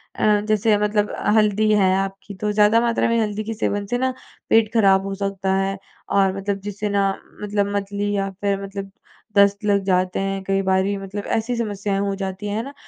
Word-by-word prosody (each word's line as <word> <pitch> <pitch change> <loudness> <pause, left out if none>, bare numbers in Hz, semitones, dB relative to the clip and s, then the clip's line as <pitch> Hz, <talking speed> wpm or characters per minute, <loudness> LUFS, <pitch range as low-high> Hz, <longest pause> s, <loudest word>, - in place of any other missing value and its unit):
अ, 210 -1 +3
जैसे 215 0 +3
मतलब 210 0 0 0.2
हल्दी 215 0 +3
है 195 -3 +4
आपकी 195 +1 -4
तो 210 0 0
ज़्यादा 210 +2 +4
मात्रा 235 -1 +1
में 230 0 +2
हल्दी 210 0 -2
के 225 +1 -4
सेवन 205 -1 -2
से 245 - +2
ना 260 +1 0 0.4
पेट 225 0 +3
खराब 195 -4 +4
हो 195 - -3
सकता 195 -1 -1
है 195 0 0 0.3
और 195 -1 +2
मतलब 195 0 -2
जिससे 205 +1 -3
ना 200 0 +2 0.4
मतलब 205 -1 0
मतली 200 +1 -2
या 195 0 -1
फिर 200 -1 0
मतलब 195 0 -6 0.5
दस्त 200 +1 +4
लग 200 -1 +2
जाते 185 0 +1
हैं 195 0 -3
कई 195 0 +1
बारी 190 +2 +2
मतलब 195 +1 -6
ऐसी 230 +2 -2
समस्याएँ 205 -3 -2
हो 200 0 -1
जाती 190 +2 -4
हैं। 205 - -2
है 225 - -2
ना? 280 +3 -9
200 Hz, 200 wpm, -22 LUFS, 195-210 Hz, 0.5 s, है